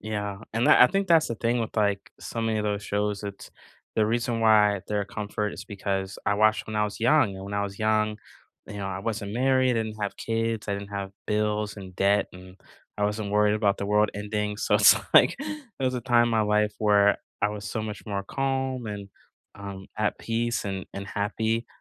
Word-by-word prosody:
Yeah, 105 -2 -4
and 115 +2 +1
that - - +8
I - - +9
think 195 +4 0
that's 165 -2 +5
the 115 - -2
thing 120 +2 0
with, 115 - -4
like, 100 -2 0
so 115 - -5
many 110 -1 0
of 105 - -2
those 105 -1 -1
shows 105 0 -1
it's 100 -1 -8 0.5
the 110 - +4
reason 115 0 0
why 105 -3 +5
they're 105 -1 -1
a - - -8
comfort 105 0 -3
is - - -8
because 95 -2 -3
I 100 - +3
watched 110 +1 +3
when 110 - -4
I 105 - +2
was 105 - -5
young, 120 -4 +3
and 95 0 -8
when 100 +1 -6
I 100 - 0
was 100 -1 -5
young, 110 0 +1 0.5
you 105 - -8
know, 100 -1 -4
I 95 -1 -4
wasn't 105 -1 -3
married, 130 +1 +3
I - - +1
didn't 110 -1 -7
have 100 -1 -3
kids, 115 -1 -2
I 100 - 0
didn't 100 0 -6
have 100 -1 -4 0.2
bills, 105 -1 -1
and 95 -2 -10
debt, 100 +1 +3
and 90 +1 -13 0.4
I 105 - +1
wasn't 105 0 -2
worried 105 0 +3
about 105 -2 +1
the 100 - -3
world 105 0 +3
ending 105 0 -2
so, 105 - 0
it's, 105 0 +8 0.2
like - - +7
it 300 -3 -6 0.2
was 130 - +1
a 125 - -2
time 120 0 +4
in - - 0
my 110 -1 +2
life 105 0 +2
where 105 -1 +4 0.3
I 105 - +4
was 105 -2 -6
so 110 - -3
much 105 -1 -6
more 100 -1 -2
calm 130 0 -2
and, 100 -1 -6 0.5
um, 100 -1 -8
at 105 -1 0
peace 115 0 -1
and 95 -2 -3
and 100 0 -6
happy, 110 +3 -1
105 Hz, 225 wpm, -26 LUFS, 100-115 Hz, 0.5 s, I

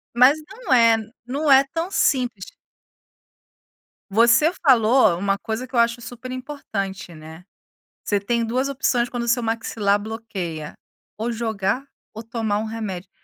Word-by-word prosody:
Mas 255 +5 +6
não 400 - -5
é 230 -2 +6 0.3
não 285 +4 -1
é 270 0 +7
tão 335 +3 -2
simples. 245 - 0 1.7
Você 235 - +5
falou 240 -6 +5
uma 195 +2 0
coisa 225 +4 -4
que 255 - -17
eu - - +1
acho 235 0 +2
super 245 +1 -8
importante, 210 - -5
né. 160 +2 -12 0.6
Você 205 - 0
tem 230 +4 -1
2 255 +4 -1
opções 245 -3 0
quando 240 -1 -4
seu 240 +1 +2
maxilar 220 -3 0
bloqueia, 200 -8 -6 0.4
ou 225 +3 -2
jogar 220 +2 -2 0.3
ou 220 +1 -8
tomar 220 -2 -2
remédio. 205 -5 -5
230 Hz, 135 wpm, -22 LUFS, 205-255 Hz, 1.7 s, é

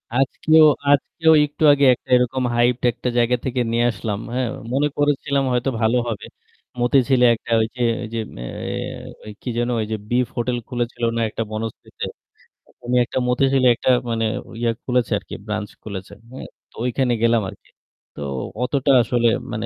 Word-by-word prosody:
আজকেও 155 +4 +4 0.3
আজকেও 160 +3 +3
একটু 145 +2 -5
আগে 140 -1 +4
একটা - - -10
এরকম 125 +1 +1
hyped 120 +1 +2
একটা 125 +1 -4
জায়গা 120 +1 +3
থেকে 125 -1 -1
নিয়ে 120 +1 +2
আসলাম, 105 0 -4
হ্যাঁ? 125 -1 0 0.3
মনে 145 +2 +2
করেছিলাম 140 -1 +1
হয়তো 125 +2 0
ভালো 115 +3 +3
হবে। 110 -3 -4 0.5
মতিঝিলে 125 0 +3
একটা 115 - -10
ওইযে 115 +3 -4 0.2
ওইযে 115 +1 -4 0.2
এ - - -5 0.8
ওই 110 - -8
কি 125 - -5
যেন 120 +1 0
ওইযে 110 0 -2
বিফ 125 0 +1
হোটেল 120 +1 0
খুলেছিল 120 -2 -4
না - - 0
একটা 115 - -3
বনশ্রীতে? 110 +1 -6 0.6
অইরকমই 125 +1 -3
একটা 130 - -3
মতিঝিলে 130 +1 +3
একটা 125 - -1 0.2
মানে 115 -1 0 0.4
ইয়া 115 -1 +2
খুলেছে 125 -3 0
আরকি, - - -13
ব্রাঞ্চ 105 -1 -3
খুলেছে। 95 -3 -7 0.2
হ্যাঁ? 130 - -8 0.2
তো - - -24
ওইখানে 125 0 +1
গেলাম 115 -1 +3
আরকি। - - -15 0.5
তো 75 - -8 0.4
অতটা 140 +1 +1
আসলে 120 0 +1 0.2
মানে 110 0 -3
125 Hz, 160 wpm, -21 LUFS, 115-130 Hz, 0.8 s, আজকেও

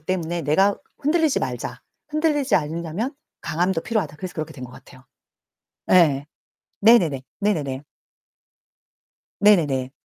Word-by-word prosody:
때문에 170 0 -2
'내가 190 +8 +3 0.2
흔들리지 310 0 +2
말자. - - -4 0.3
흔들리지 300 -4 +1
않으려면 170 - -3 0.3
강함도 175 +2 0
필요하다.' 190 -11 -2
그래서 180 +2 -7
그렇게 155 0 -5
된 130 -4 -9
것 125 - -11
같아요. 130 +1 -16 0.9
예예. 150 -6 +5 0.6
네네네. 180 - +5 0.2
네네네. 150 -9 -1 1.6
네네네. 150 -11 +3
170 Hz, 285 characters per minute, -23 LUFS, 150-210 Hz, 1.6 s, 예예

